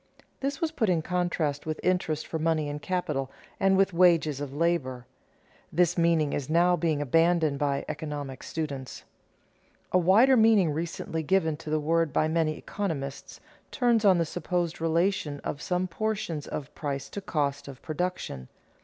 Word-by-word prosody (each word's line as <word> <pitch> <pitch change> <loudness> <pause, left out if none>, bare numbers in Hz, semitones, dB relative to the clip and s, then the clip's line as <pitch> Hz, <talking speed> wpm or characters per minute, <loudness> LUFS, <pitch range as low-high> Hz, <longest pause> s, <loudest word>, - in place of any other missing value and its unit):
This 275 0 -2
was 325 -2 -1
put 230 -10 0
in 165 -3 +1
contrast 170 -5 -1
with 155 0 -3
interest 170 -4 0
for 160 - -4
money 160 -1 +1
and 145 0 -5
capital, 155 -8 -2 0.3
and 195 0 +4
with 195 -1 +3
wages 165 -5 +3
of 145 -2 -4
labor. 140 -5 -1 0.7
This 175 +1 +2
meaning 165 -4 +2
is 140 -1 -3
now 175 +2 +4
being 155 -3 0
abandoned 165 0 +2
by 140 -1 0
economic 145 -4 -5
students. 140 -5 -5 0.9
A 185 - +4
wider 215 +10 +5
meaning 220 -7 +5
recently 160 +1 -3
given 160 -1 +1
to 155 - -9
the 155 0 +1
word 165 +1 +1
by 155 - +2
many 160 -1 0
economists 150 -9 -5 0.3
turns 240 -4 +2
on 190 -3 +6
the 170 - +1
supposed 175 0 -2
relation 165 -2 0
of 145 - -5
some 180 +2 -1
portions 185 -5 -3
of 145 -1 -6
price 140 -2 -4
to 200 - -6
cost 145 -6 -2
of 135 -2 -9
production. 155 - -3
165 Hz, 160 wpm, -27 LUFS, 145-180 Hz, 0.9 s, on